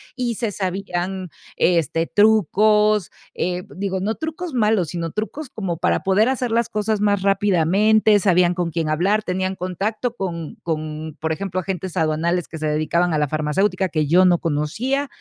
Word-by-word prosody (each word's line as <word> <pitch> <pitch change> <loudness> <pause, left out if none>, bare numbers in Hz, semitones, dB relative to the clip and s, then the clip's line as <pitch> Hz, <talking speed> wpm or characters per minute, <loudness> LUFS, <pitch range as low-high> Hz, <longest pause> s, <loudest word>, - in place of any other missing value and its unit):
y 250 -2 -1
se 225 -1 -2
sabían, 185 -1 -3 0.3
este, 165 -1 +1
trucos, 210 -1 +3 0.2
eh, 180 0 -2
digo, 190 0 -2
no 210 +4 -1
trucos 320 -1 -5
malos, 215 -6 +2
sino 165 -1 -4
trucos 235 - -5
como 185 -6 -3
para - - +1
poder 195 +3 +3
hacer 255 -1 -1
las 230 0 +1
cosas 210 0 -1
más 205 -1 +2
rápidamente. 200 +2 +3
Sabían 180 -2 +3
con 175 -2 -2
quién 160 -1 -2
hablar, 190 +8 +2
tenían 185 0 -2
contacto 200 +7 -3
con 170 -6 -5
con, 155 -1 -4
por 160 0 -1
ejemplo, 185 +2 -3
agentes 185 -1 -4
aduanales 165 +1 0
que 160 - -8
se 155 - -4
dedicaban 155 +3 +1
a 155 - +1
la 150 - +1
farmacéutica 180 +6 0
que 155 -3 0
yo 180 +5 +5
no 175 -2 +4
conocía. 215 - -1
185 Hz, 165 wpm, -21 LUFS, 170-210 Hz, 0.3 s, yo